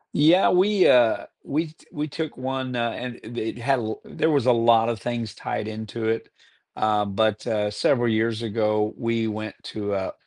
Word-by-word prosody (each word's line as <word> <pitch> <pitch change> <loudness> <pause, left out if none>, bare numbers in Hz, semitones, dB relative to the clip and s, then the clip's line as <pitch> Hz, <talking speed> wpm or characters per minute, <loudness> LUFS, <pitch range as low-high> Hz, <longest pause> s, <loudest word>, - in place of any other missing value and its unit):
Yeah, 165 +6 +5
we, 190 +2 +4
uh 120 -3 +4 0.2
we 160 +4 -1
t - - -24
we 150 +1 -3
took 155 +1 -5
one, 130 0 -3
uh, 120 -1 0
and 125 0 -6
it 115 +2 -9
it 110 +1 -3
had 130 +2 +1
l 110 -1 -4
there 160 - 0
was 140 -6 +2
a 130 - +6
lot 115 -1 +4
of 115 -2 -2
things 120 -3 -3
tied - - -4
into 110 +1 -5
it, 115 0 -1 0.5
uh, 105 -1 +2
but, 110 +2 0
uh, 105 -2 0
several 120 +3 +2
years 115 0 0
ago, 105 -1 0
we 115 -1 -1
went 110 0 -5
to 105 -1 -4
a 95 -1 -3
115 Hz, 195 wpm, -24 LUFS, 110-130 Hz, 0.5 s, a